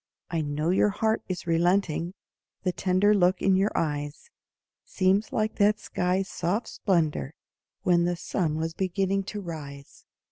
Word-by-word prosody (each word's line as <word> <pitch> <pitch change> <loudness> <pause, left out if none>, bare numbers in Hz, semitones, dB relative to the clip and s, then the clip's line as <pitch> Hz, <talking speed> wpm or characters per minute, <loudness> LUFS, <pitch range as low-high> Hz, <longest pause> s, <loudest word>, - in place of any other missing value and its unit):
I 165 -2 0
know 150 +3 -1
your 195 +2 +4
heart 220 +2 0
is 185 -1 -4
relenting, 175 +1 +1 0.5
The 185 - +1
tender 190 +3 +2
look 185 -2 +3
in 195 -1 +3
your 195 +2 +3
eyes 145 - -3 0.5
Seems 195 +3 +1
like 215 0 -1
that 210 +1 +3
sky's 185 +1 -1
soft 190 +5 -2
splendor 160 -6 0 0.5
When 175 -3 +3
the 175 0 0
sun 165 -2 -1
was 160 +1 -2
beginning 195 +2 0
to 210 +1 -5
rise. 145 -5 -9
180 Hz, 145 wpm, -27 LUFS, 165-195 Hz, 0.5 s, your